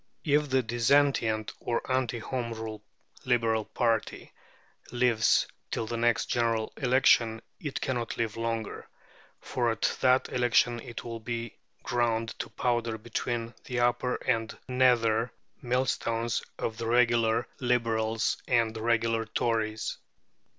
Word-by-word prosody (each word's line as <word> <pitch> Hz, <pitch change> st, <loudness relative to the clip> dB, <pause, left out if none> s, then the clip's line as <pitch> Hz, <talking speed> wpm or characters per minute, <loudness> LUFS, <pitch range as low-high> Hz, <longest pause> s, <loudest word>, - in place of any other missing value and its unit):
If 150 Hz, -1 st, +2 dB
the 130 Hz, -1 st, +2 dB
dissentient, 115 Hz, -2 st, +2 dB
or 120 Hz, -, -1 dB
anti 130 Hz, -2 st, 0 dB
Home 115 Hz, 0 st, -3 dB
Rule, 110 Hz, -1 st, -6 dB, 0.4 s
Liberal 115 Hz, -3 st, +1 dB
party 115 Hz, -3 st, -1 dB, 0.6 s
lives 120 Hz, -2 st, +3 dB, 0.2 s
till 115 Hz, -, -2 dB
the 115 Hz, +2 st, -4 dB
next 115 Hz, 0 st, +2 dB
general 115 Hz, -2 st, 0 dB
election, 125 Hz, -3 st, +3 dB, 0.2 s
it 145 Hz, -3 st, -4 dB
cannot 120 Hz, -3 st, -2 dB
live 115 Hz, -3 st, -1 dB
longer, 115 Hz, -1 st, -3 dB, 0.5 s
for 120 Hz, -2 st, 0 dB
at 115 Hz, -, 0 dB
that 130 Hz, 0 st, +4 dB
election 120 Hz, -1 st, +3 dB
it 115 Hz, 0 st, -8 dB
will 115 Hz, -1 st, -6 dB
be 115 Hz, 0 st, -5 dB, 0.3 s
ground 115 Hz, -2 st, 0 dB
to -, -, -4 dB
powder 120 Hz, -2 st, -1 dB
between 115 Hz, +1 st, -3 dB
the 125 Hz, -1 st, -1 dB
upper 120 Hz, +1 st, +1 dB
and 115 Hz, 0 st, -1 dB
nether 120 Hz, -2 st, +3 dB, 0.3 s
millstones 120 Hz, -2 st, 0 dB, 0.2 s
of 110 Hz, -, -3 dB
the 115 Hz, -, -3 dB
regular 115 Hz, -1 st, +3 dB
Liberals 115 Hz, -3 st, +1 dB
and 115 Hz, -3 st, +2 dB
the 110 Hz, -, -5 dB
regular 115 Hz, 0 st, +1 dB
Tories. 110 Hz, 0 st, -1 dB
115 Hz, 125 wpm, -29 LUFS, 115-125 Hz, 0.6 s, that